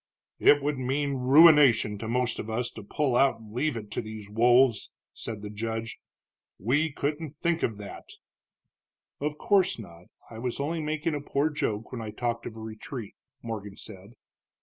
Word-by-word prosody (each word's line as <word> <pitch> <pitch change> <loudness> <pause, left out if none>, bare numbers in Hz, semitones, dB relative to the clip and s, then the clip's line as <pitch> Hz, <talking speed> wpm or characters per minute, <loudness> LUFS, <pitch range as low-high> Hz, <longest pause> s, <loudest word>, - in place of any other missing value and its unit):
"It 145 -1 +6
would 145 -2 -1
mean 140 +2 0
ruination 135 -5 +6
to 110 - -5
most 125 0 0
of 110 - -5
us 120 +2 -1
to 110 - -9
pull 130 +5 -1
out 130 -2 +3
and 110 -1 -13
leave 135 +1 0
it 105 -2 -8
to - - -2
these 110 -2 -9
wolves," 120 +1 +4 0.2
said 110 -2 -7
the 105 - -5
judge. 115 +1 -4 0.6
"We 145 +9 +1
couldn't 150 +3 -2
think 165 +2 -1
of 110 - -1
that." 105 -1 -9 1.1
"Of 150 +1 -2
course 195 0 +2
not, 85 -6 -11 0.2
I 110 - -10
was 125 +2 -3
only 160 +4 -1
making 155 +1 -1
a 145 - -2
poor 145 +2 0
joke 115 -8 -2
when 125 - -5
I 110 - -5
talked 115 +2 -3
of 115 - -8
a - - -8
retreat," 110 +1 -7 0.3
Morgan 105 -4 -6
said. 100 +2 -10
120 Hz, 175 wpm, -28 LUFS, 110-145 Hz, 1.1 s, It